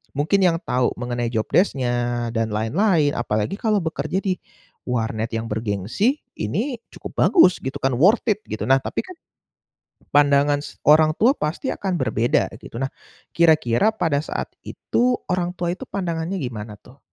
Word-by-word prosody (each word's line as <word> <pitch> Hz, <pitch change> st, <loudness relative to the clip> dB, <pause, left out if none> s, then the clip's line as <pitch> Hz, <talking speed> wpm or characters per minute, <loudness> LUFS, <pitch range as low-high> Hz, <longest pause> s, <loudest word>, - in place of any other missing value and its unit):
mungkin 150 Hz, +8 st, +2 dB
yang 170 Hz, -2 st, +4 dB
tahu 125 Hz, 0 st, +1 dB
mengenai 120 Hz, -1 st, -2 dB
job 110 Hz, -2 st, -1 dB
desc-nya 120 Hz, -8 st, +1 dB
dan 115 Hz, 0 st, 0 dB
lain-lain, 150 Hz, -, +2 dB
apalagi 110 Hz, -, -1 dB
kalau 215 Hz, -2 st, +2 dB
bekerja 160 Hz, +2 st, -2 dB
di 185 Hz, -2 st, -1 dB, 0.5 s
warnet 115 Hz, -2 st, -2 dB
yang 115 Hz, 0 st, -3 dB
bergengsi 110 Hz, -, -1 dB, 0.2 s
ini 225 Hz, -, -2 dB
cukup -, -, -9 dB
bagus 185 Hz, -, +5 dB
gitu 130 Hz, 0 st, -3 dB
kan 135 Hz, -2 st, +2 dB
worth 190 Hz, -, +4 dB
it 210 Hz, -2 st, +2 dB
gitu, 110 Hz, -, -4 dB
nah 135 Hz, +1 st, +5 dB
tapi -, -, -3 dB
kan 370 Hz, -, -10 dB, 1.0 s
pandangan 145 Hz, 0 st, +4 dB
s 145 Hz, -, -10 dB
orang 155 Hz, +1 st, +6 dB
tua 250 Hz, +5 st, +4 dB
pasti 155 Hz, -, -2 dB
akan 190 Hz, -2 st, -3 dB
berbeda 110 Hz, -1 st, +1 dB
gitu. -, -, -10 dB
Nah, 135 Hz, -, -1 dB, 0.5 s
kira-kira 160 Hz, -, +4 dB
pada 165 Hz, -9 st, 0 dB
saat -, -, -4 dB, 0.2 s
itu 250 Hz, +1 st, 0 dB
orang 180 Hz, -1 st, -1 dB
tua 175 Hz, -1 st, -2 dB
itu -, -, -9 dB
pandangannya 175 Hz, -1 st, -3 dB
gimana 110 Hz, -4 st, -6 dB
tuh? 135 Hz, +2 st, -18 dB
145 Hz, 160 wpm, -22 LUFS, 120-185 Hz, 1.0 s, orang